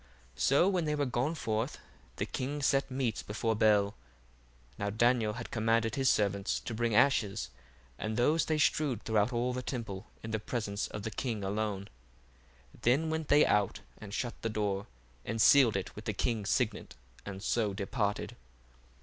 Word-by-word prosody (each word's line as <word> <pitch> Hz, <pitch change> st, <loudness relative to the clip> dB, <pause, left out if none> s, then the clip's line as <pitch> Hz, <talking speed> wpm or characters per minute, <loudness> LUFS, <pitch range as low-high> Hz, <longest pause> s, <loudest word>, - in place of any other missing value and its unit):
1:14 70 Hz, -, -9 dB
So 140 Hz, +7 st, +4 dB
when 185 Hz, -4 st, +1 dB
they 150 Hz, 0 st, 0 dB
were 145 Hz, -1 st, 0 dB
gone 130 Hz, +5 st, -1 dB
forth, 115 Hz, -2 st, -2 dB, 0.4 s
the -, -, -2 dB
king 145 Hz, +3 st, -3 dB
set 135 Hz, 0 st, +2 dB
meats 130 Hz, -4 st, -1 dB
before 110 Hz, +2 st, -1 dB
Bel. 105 Hz, -2 st, +3 dB, 0.9 s
Now 100 Hz, -, -1 dB
Daniel 115 Hz, 0 st, +2 dB
had 115 Hz, 0 st, -7 dB
commanded 115 Hz, 0 st, +1 dB
his 135 Hz, 0 st, +2 dB
servants 100 Hz, -1 st, +1 dB
to 120 Hz, -, -5 dB
bring 115 Hz, -1 st, 0 dB
ashes, 110 Hz, -4 st, +2 dB, 0.5 s
and 110 Hz, +1 st, -3 dB
those 150 Hz, +7 st, +3 dB
they 155 Hz, -, 0 dB
strewed 150 Hz, -6 st, +1 dB
throughout 110 Hz, +1 st, +2 dB
all 125 Hz, +1 st, 0 dB
the 125 Hz, -, -3 dB
temple 110 Hz, -6 st, -5 dB, 0.2 s
in 110 Hz, -, -5 dB
the 110 Hz, -, 0 dB
presence 105 Hz, -2 st, -3 dB
of 105 Hz, -, -7 dB
the 110 Hz, -, -3 dB
king 110 Hz, -1 st, -3 dB
alone: 100 Hz, 0 st, -2 dB, 0.9 s
then 145 Hz, +7 st, +2 dB
went 160 Hz, -1 st, -2 dB
they 145 Hz, +1 st, +6 dB
out, 105 Hz, -2 st, +1 dB, 0.2 s
and 105 Hz, -2 st, -9 dB
shut 120 Hz, +3 st, -2 dB
the 115 Hz, -, -1 dB
door, 105 Hz, -2 st, -1 dB, 0.4 s
and 115 Hz, -, -3 dB
sealed 125 Hz, -2 st, +6 dB
it 95 Hz, -3 st, -3 dB
with -, -, -9 dB
the -, -, -1 dB
king's 110 Hz, -4 st, -1 dB
signet, 110 Hz, -, -1 dB, 0.3 s
and 100 Hz, -1 st, -7 dB
so 110 Hz, -2 st, +1 dB
departed. 105 Hz, +1 st, -2 dB
115 Hz, 175 wpm, -31 LUFS, 105-130 Hz, 0.9 s, they